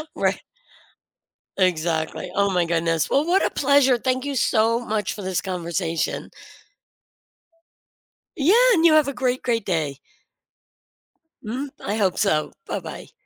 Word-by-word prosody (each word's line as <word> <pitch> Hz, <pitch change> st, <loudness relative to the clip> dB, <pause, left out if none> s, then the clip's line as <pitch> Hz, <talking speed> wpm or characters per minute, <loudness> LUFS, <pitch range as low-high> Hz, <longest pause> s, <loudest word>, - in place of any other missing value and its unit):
Righ -, -, 0 dB, 1.2 s
Exactly. 170 Hz, -2 st, -1 dB
Oh 200 Hz, 0 st, +2 dB
my 180 Hz, -2 st, +1 dB
goodness. 165 Hz, -1 st, 0 dB
Well, 285 Hz, +3 st, +2 dB
what 365 Hz, +3 st, +2 dB
a -, -, +1 dB
pleasure, 275 Hz, -3 st, +3 dB
thank 255 Hz, +2 st, -1 dB
you 280 Hz, -1 st, -3 dB
so 230 Hz, 0 st, +2 dB
much 215 Hz, -4 st, -2 dB
for 205 Hz, -, -8 dB
this 185 Hz, -1 st, -2 dB
conversation. 170 Hz, -2 st, -3 dB, 2.1 s
Yeah, 310 Hz, +8 st, +3 dB, 0.2 s
and 335 Hz, -2 st, +3 dB
you 320 Hz, -, +6 dB
have 305 Hz, -3 st, +4 dB
a -, -, -4 dB
great 255 Hz, 0 st, -1 dB
great 230 Hz, -4 st, -1 dB
day. 155 Hz, -6 st, -1 dB, 1.5 s
Mm, 255 Hz, +6 st, -4 dB
I 205 Hz, -, -2 dB
hope 195 Hz, -4 st, 0 dB
so. 155 Hz, -7 st, +1 dB, 0.2 s
Bye-bye. -, -, -6 dB
210 Hz, 130 wpm, -23 LUFS, 175-260 Hz, 2.1 s, you